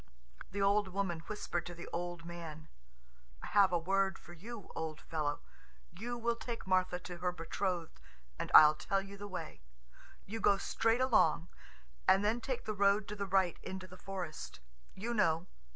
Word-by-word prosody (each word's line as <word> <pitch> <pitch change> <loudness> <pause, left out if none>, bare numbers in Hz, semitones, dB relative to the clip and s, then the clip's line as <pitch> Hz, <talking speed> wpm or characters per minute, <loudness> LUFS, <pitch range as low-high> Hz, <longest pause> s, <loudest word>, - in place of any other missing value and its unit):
The 200 +1 -1
old 200 0 +4
woman 185 -3 -2
whispered 205 -5 -2
to 175 - -7
the 170 - -8
old 175 -1 -4
man: 165 -3 -8 0.7
"I - - -3
have 200 -2 +5
a 175 - +3
word 190 +3 +1
for 175 - -13
you, 210 +4 -9
old 160 -1 -3
fellow. 150 -3 -2 0.5
You 235 +8 -5
will 235 0 0
take 235 0 -6
Martha 185 -1 +2
to 175 -1 -7
her 180 +1 0
betrothed, 175 0 -3 0.4
and - - -3
I'll 150 0 +11
tell 195 +5 -1
you 195 +1 -9
the 205 +1 -7
way. 170 - -6 0.6
You 225 +3 -5
go 200 -2 +4
straight 225 +4 +1
along, 180 -9 +3 0.6
and 195 +2 +5
then 225 +3 +1
take 255 0 -3
the 215 - -1
road 200 +1 +3
to 210 - -4
the 200 -1 -3
right 190 -2 +2
into 190 0 -6
the 185 0 -12
forest... 185 -4 -6 0.4
you 230 +5 -3
know 165 -6 +2
190 Hz, 175 wpm, -34 LUFS, 175-205 Hz, 0.7 s, I'll